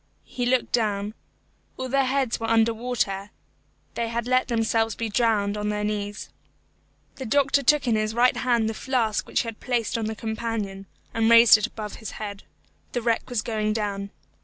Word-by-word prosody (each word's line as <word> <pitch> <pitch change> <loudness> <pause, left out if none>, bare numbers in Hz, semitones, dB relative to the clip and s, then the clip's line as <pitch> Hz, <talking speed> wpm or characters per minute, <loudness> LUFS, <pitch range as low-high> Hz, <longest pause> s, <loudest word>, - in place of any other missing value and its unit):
He 245 -1 -3
looked 255 0 +1
down. 210 -3 0 0.6
All 260 - -3
their 270 +1 +2
heads 260 -2 0
were 225 0 -3
under 225 0 +4
water. 220 -4 -2 0.6
They 235 - -2
had 235 0 -2
let 255 +1 +2
themselves 225 -2 +1
be 230 -1 -3
drowned 210 -2 +1
on 210 0 -2
their 210 0 -2
knees. 205 0 -3 0.9
The 265 - -6
doctor 280 +3 +3
took 280 0 +3
in 230 - +3
his 215 0 -1
right 245 +1 +4
hand 235 -3 +1
the 220 - -2
flask 230 -3 -1
which - - +1
he - - -6
had 225 -1 -6
placed 240 -1 -1
on 220 - -2
the 220 0 -3
companion, 220 -3 -4 0.3
and 225 0 +2
raised 230 -1 +9
it 215 - +1
above 210 -2 -7
his 220 - -7
head. 205 -2 -6 0.5
The 245 - -2
wreck 230 +1 0
was 240 -4 -1
going 215 -2 -1
down. 200 -2 -3
225 Hz, 185 wpm, -25 LUFS, 210-245 Hz, 0.9 s, raised